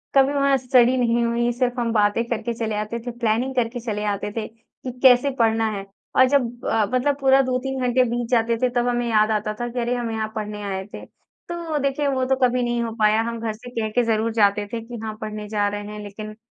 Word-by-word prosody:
कभी 275 +1 +5
वहाँ 275 -1 +3
स्टडी 250 0 +3
नहीं 235 -1 +2
हुई 240 +1 +1
सिर्फ़ 245 0 -1
हम 230 -1 0
बातें 210 +2 +2
करके 235 0 -2
चले 220 -2 -3
आते 215 +3 -3
थे, 245 +1 -6
प्लानिंग 240 +2 -1
करके 245 0 0
चले 215 -3 -3
आते 205 0 -2
थे 220 0 -4
कि 230 +3 -11
कैसे 255 +2 +6
पढ़ना 225 -1 +3
है 200 -1 -5 0.3
और 260 - +7
जब 245 -3 0
अ, 220 -2 +2
मतलब 275 +3 +1
पूरा 270 0 +5
2-3 260 +1 -2
घंटे 250 +1 +3
बीत 240 0 -2
जाते 230 -1 +2
थे 250 - +3
तब 245 0 +2
हमें 240 0 0
याद 215 0 +3
आता 215 0 -1
था 240 - -1
कि 245 +1 -4
अरे 240 +1 0
हम 235 -2 -3
यहाँ 220 -1 -3
पढ़ने 210 -1 -4
आए 190 -1 -3
थे। - - -8
तो 340 -3 -7
देखिए, 280 +1 0
वो 260 -2 0
तो 265 +1 +2
कभी 250 0 +2
नहीं 240 0 0
हो 230 - -3
पाया 215 +1 +4
हम 230 0 -3
घर 225 -1 -2
से 245 +3 -11
कह 220 -1 -1
के 245 +2 +2
ज़रूर 225 0 0
जाते 205 -1 +3
थे 230 - -2
कि 235 +1 -8
हाँ 215 -1 -4
पढ़ने 210 -1 -5
जा 205 -1 +1
रहे 205 0 -3
हैं 210 - -7
लेकिन 215 +1 -8
235 Hz, 240 wpm, -22 LUFS, 215-250 Hz, 0.3 s, और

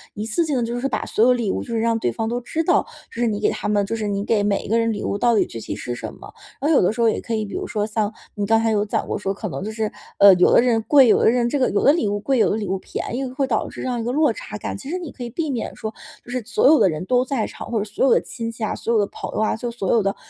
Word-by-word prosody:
一 210 - -4
次 235 +10 0
性 290 -4 -1
地 240 - 0
就 235 +1 -3
是 270 - -1
把 - - -2
所 220 - +1
有 250 - +6
礼 235 -5 0
物 - - -2
就 235 - -5
是 - - +1
让 230 0 +1
对 120 - 0
方 225 - -3
都 240 +2 -2
知 315 +7 -2
道， - - +2 0.2
这 235 - -5
是 240 - +3
你 210 -2 -1
给 210 - +2
他 - - -4
们 205 -1 +1
就 225 - -3
是 215 -2 -3
你 200 0 -2
给 215 -2 +2
每 205 -1 0
一 - - -8
个 225 +3 +2
人 230 0 +1
礼 205 - -4
物 200 - -2
到 235 -2 +3
底 - - +3
具 115 - -8
体 - - -5
是 120 - -5
什 120 - -6
么。 - - -13 0.3
然 280 - -1
后 - - +5
有 - - +5
的 180 - +3
时 220 - -8
候 230 - +4
也 - - 0
可 230 - -3
以， 215 -1 -1
比 200 - -9
如 - - -3
说 210 -2 -1
像 215 -1 -1 0.2
你 205 -1 -3
刚 225 0 +4
才 225 0 +1
有 205 -1 +2
讲 210 - -2
过 - - -3
说 195 - -2
可 210 +2 -5
能 185 - -5
就 215 - -4
是， 215 -1 -2 0.3
呃， 200 -1 +9
有 180 - +4
的 - - +6
人 235 -2 +2
贵， 275 -4 +7
有 - - +5
的 - - +4
人 240 0 +2
这 285 +3 -1
个 255 - +2
有 200 - 0
的 280 - +7
礼 270 -10 0
物 205 - 0
贵、 265 +4 0
有 - - +4
的 - - 0
礼 215 - -3
物 190 +1 -1
便 235 - -5
宜 270 - -2
会 265 +2 -1
导 240 - 0
致 - - -8
这 - - -3
样 245 -2 -2
一 - - -3
个 245 - -1
落 300 -3 +3
差 210 - -7
感。 - - -5
其 265 - -9
实 360 - -2
你 340 -5 -7
可 250 - -14
以 240 - -5
避 310 +5 -3
免 240 -4 -4
说 220 0 -5 0.3
就 245 - -11
是 255 - -2
所 245 - +2
有 305 +2 +6
的 200 - +5
人 155 +2 -4
都 250 +3 +2
在 260 -5 -1
场， - - -9
或 230 - 0
者 205 - -1
所 210 +4 -1
有 270 - +4
的 - - +3
亲 230 -2 -5
戚 230 0 -7
啊、 215 - -1
所 235 - -2
有 225 - +4
的 205 - +2
朋 - - -7
友 - - -1
啊， 215 - +1
就 240 +1 -4
所 200 -6 -2
有 230 - +4
的 195 0 -1
225 Hz, 390 characters per minute, -22 LUFS, 210-245 Hz, 0.3 s, 呃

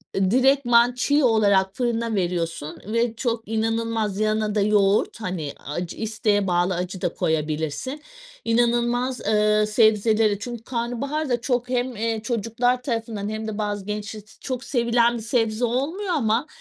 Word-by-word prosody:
direktman 245 +4 +4
çiğ 285 +4 +2
olarak 200 -5 +3
fırına 235 -3 -1
veriyorsun 170 -4 -2
ve 230 +1 0
çok 230 -1 -2
inanılmaz 225 -2 -1
yanına 215 0 0
da 210 - +2
yoğurt 205 +1 +2
hani 175 -7 -4
acı 170 +4 -4
isteğe 215 -2 0
bağlı 175 +1 +1
acı 180 +1 -4
da 175 - -1
koyabilirsin 160 - -2 0.4
inanılmaz, 240 +2 +1
ııı, 210 0 +3
sebzelere 215 -1 +3
Çünkü 235 +1 -6
karnabahar 260 +5 -3
da 240 -1 0
çok 245 0 -1
hem, 250 -1 -1
eee, 225 0 -2
çocuklar 240 +2 0
tarafından 225 -4 -3
hem 220 0 -4
de 215 -1 -4
bazı 205 -2 -3
gençler 210 +1 -5 0.2
çok 255 -1 -4
sevilen 235 -1 +2
bir - - -6
sebze 225 0 0
olmuyor 320 - -1
ama 240 -1 +1
225 Hz, 140 wpm, -23 LUFS, 205-240 Hz, 0.4 s, direktman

